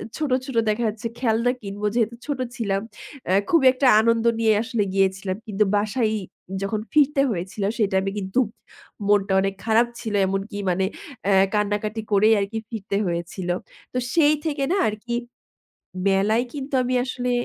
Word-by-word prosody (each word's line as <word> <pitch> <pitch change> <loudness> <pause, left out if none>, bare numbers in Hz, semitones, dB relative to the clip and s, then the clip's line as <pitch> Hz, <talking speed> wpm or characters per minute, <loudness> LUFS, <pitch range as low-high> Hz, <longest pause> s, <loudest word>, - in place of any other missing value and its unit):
ছোট, 305 -2 -2 0.2
ছোট 265 -3 -7
দেখা 215 +3 0
যাচ্ছে 215 +2 -5
খেলনা 235 0 +2
কিনব, 200 0 -7
যেহেতু 235 0 +1
ছোট 290 -3 -3 0.2
ছিলাম। 200 -5 -1 0.5
আ - - +4 0.2
খুবই 320 -6 +4
একটা 260 0 +2
আনন্দ 230 0 +2
নিয়ে 220 -1 +4
আসলে 225 -2 -1
গিয়েছিলাম। 195 0 0
কিন্তু 210 0 +2
বাসায় 215 +2 +1 0.5
যখন 200 +2 -1
ফিরতে 295 -2 +4
হয়েছিল 190 +2 -4
সে 220 - +2
টাইমে 190 +1 +1
কিন্তু 190 +5 -1 0.7
মনটা 200 -1 +3
অনেক 195 0 -1
খারাপ 230 +2 +4
ছিল। 220 - -4
এমনকি 195 +2 -3
মানে 185 +1 +1 0.4
আ 200 - +4 0.2
কান্না-কাটি 210 +1 -1
করেই 215 +2 +5
আর 200 - +1
কি 225 - -2
ফিরতে 200 -3 -3
হয়েছিল। 175 +1 -4 0.4
তো - - -2 0.2
সেই 305 -2 +5
থেকে 290 -3 -1
না 395 - +2
আর 215 - -1
কি 240 -1 -2 0.9
মেলায় 205 +5 +2
কিন্তু 275 -1 -5
আমি 250 +1 -1
আসলে 250 -1 -3
215 Hz, 160 wpm, -23 LUFS, 195-245 Hz, 0.9 s, করেই